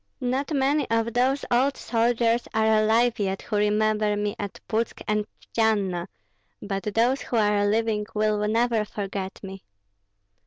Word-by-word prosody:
Not 265 +3 -2
many 285 +1 +1
of 230 0 0
those 260 +3 +1
old 265 +4 +2
soldiers 235 0 +1
are 220 0 +3 0.2
alive 230 +2 +2
yet 195 -1 -2
who 210 - -2
remember 210 0 +1
me 205 0 -2
at 205 -1 -5
Putsk 230 0 -2
and 210 0 0 0.3
Tjtsianna; 200 -6 +1 0.5
but 195 -1 -4
those 245 +4 +2
who 245 - -4
are 210 -2 +2
living 215 0 0
will 210 0 +1
never 230 0 +1
forget 195 -2 -5
me." 195 0 -8
220 Hz, 145 wpm, -25 LUFS, 210-235 Hz, 0.5 s, are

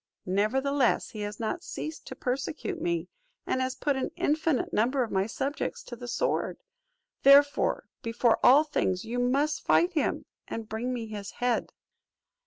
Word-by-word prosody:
Nevertheless, 250 +7 +1
he 215 - -8
has 205 0 -5
not 230 +10 -2
ceased 310 0 -6
to - - -7
persecute 275 +7 -3
me, 345 0 -1 0.4
and 260 - 0
has 260 0 -1
put 285 -2 0
an 265 - -2
infinite 305 -2 0
number 255 +5 +2
of 230 - -5
my 190 +1 +1
subjects 270 +6 -3
to 240 - -8
the 245 +1 -9
sword: 240 - -1 0.6
therefore, 285 +1 +5
before 230 0 +2
all 270 +4 +8
other 310 - -7
things 185 -5 0
you 240 +2 -3
must 280 +5 +1
fight 350 +2 +3
him, 310 - 0 0.2
and 225 -1 -5
bring 225 +4 -3
me 240 -2 -3
his 210 -2 -6
head." 245 -1 0
255 Hz, 165 wpm, -28 LUFS, 225-285 Hz, 0.6 s, all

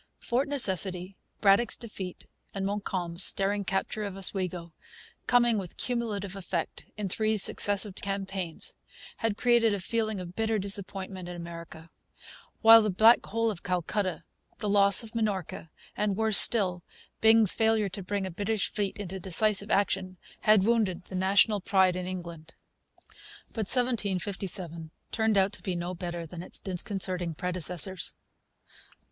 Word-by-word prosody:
Fort 250 +4 -1
Necessity, 190 -8 +2 0.3
Braddock's 200 +3 +3
Defeat, 195 -6 -8 0.3
and 195 -1 -3
Montcalm's 185 -3 +1
daring 200 +1 -1
capture 195 +2 -3
of 200 -2 -6
Oswego, 180 -3 0 0.5
coming 240 -3 +3
with 185 -3 -8
cumulative 210 -6 -3
effect, 180 -3 -5
in 210 -2 -3
three 215 +3 0
successive 205 0 +4
campaigns, 195 -3 -4 0.4
had 225 -3 -2
created 235 -3 +3
a - - -5
feeling 220 +1 -2
of 180 0 -9
bitter 225 0 0
disappointment 195 -2 -3
in 175 - -7
America; 170 -1 -10 0.7
while 225 0 +9
the 215 - -1
Black 220 +5 +5
Hole 230 +1 -1
of 185 - -9
Calcutta; 180 -1 -2 0.3
the 215 - -4
loss 200 0 +4
of 225 0 -12
Minorca, 205 -7 -3 0.3
and, 205 -2 -1
worse 220 -2 +5
still, 185 -6 +3 0.4
Byng's 220 -2 +7
failure 220 -2 +1
to 190 +2 -7
bring 195 +1 -3
a 190 - -5
British 205 +3 -2
fleet 205 -2 -3
into 190 -2 -6
decisive 200 +3 +2
action, 190 -2 0 0.2
had 215 -2 +4
wounded 200 -5 0
the 190 - -8
national 200 +2 +2
pride 190 -1 +2
in 180 0 -4
England. 170 -3 -8 0.9
But 220 -4 -4
1757 195 -8 -1 0.2
turned 220 -2 +1
out 195 +1 +2
to - - -5
be 185 -3 -3
no 175 +1 -4
better 175 -1 -6
than 170 +1 -9
its - - -6
disconcerting 185 -3 -2
predecessors. 180 +1 -2
195 Hz, 140 wpm, -28 LUFS, 180-215 Hz, 0.9 s, while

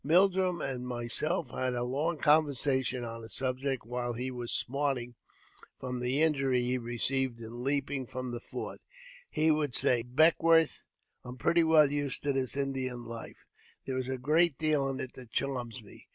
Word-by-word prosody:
I - - -9
Mildrum 185 +1 +3
and 125 -2 -4
myself 125 +5 +1
had 130 -1 -1
a 120 - -1
long 145 +7 -1
conversation 140 -4 +2
on 115 0 -6
the 110 - -10
subject 130 +1 -2
j - - -20
while 120 0 -2
he 125 +3 -3
was 120 -2 -5
smarting 135 -2 -1 0.7
from 125 -1 -4
the 130 +5 +1
injury 140 -5 +2
he 125 +1 0
received 120 +1 -1
in 115 +2 -8
leaping 140 -1 -1
I - - -22
from 130 -1 -4
the 120 - -4
fort. - - -7 0.5
He 155 +1 +2
would 150 -5 0
say, 120 -2 +4
Beckwourth, 160 +5 +3 0.4
I - - -12
am 125 - -8
pretty 170 +5 +3
well 155 -3 +5
used 145 -2 -2
to 140 -1 +1
this 135 0 -1
Indian 130 -3 -2
life; 115 0 -9 0.4
there 130 -1 -2
is 130 0 -4
a 130 - -2
great 155 +3 +3
deal 150 -3 +2
in 135 - -4
it 130 - -5
that 125 -3 -12
charms 125 -3 -3
me. 100 - -16
130 Hz, 185 wpm, -30 LUFS, 125-145 Hz, 0.7 s, well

